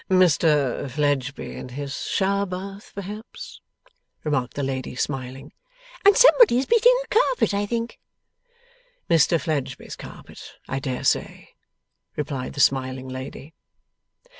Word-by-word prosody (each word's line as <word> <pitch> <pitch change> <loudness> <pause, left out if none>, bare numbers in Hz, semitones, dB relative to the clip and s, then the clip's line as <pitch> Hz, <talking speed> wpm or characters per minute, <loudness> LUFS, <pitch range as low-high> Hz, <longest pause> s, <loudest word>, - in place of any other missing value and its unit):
'Mr 155 -7 +3
Fledgeby 140 -1 -1
in - - -8
his 140 +1 -5
shower 200 +1 +1
bath, 195 +2 -7
perhaps,' 205 +3 -8 0.6
remarked 130 -5 -1
the 145 - -2
lady, 130 -2 -3
smiling. 130 0 -4 0.5
'And 400 +2 +6
somebody's 485 - +6
beating 475 +2 +5
a - - -18
carpet, 480 - +2
I 205 +1 0
think?' 235 +1 -3 1.1
'Mr 165 0 +4
Fledgeby's 150 -2 -3
carpet, - - -12
I 135 - -2
dare 130 -2 -4
say,' - - -1 0.7
replied 140 -3 -4
the 140 - -7
smiling 130 -1 +1
lady. 130 +4 -8
150 Hz, 115 wpm, -24 LUFS, 135-200 Hz, 1.1 s, And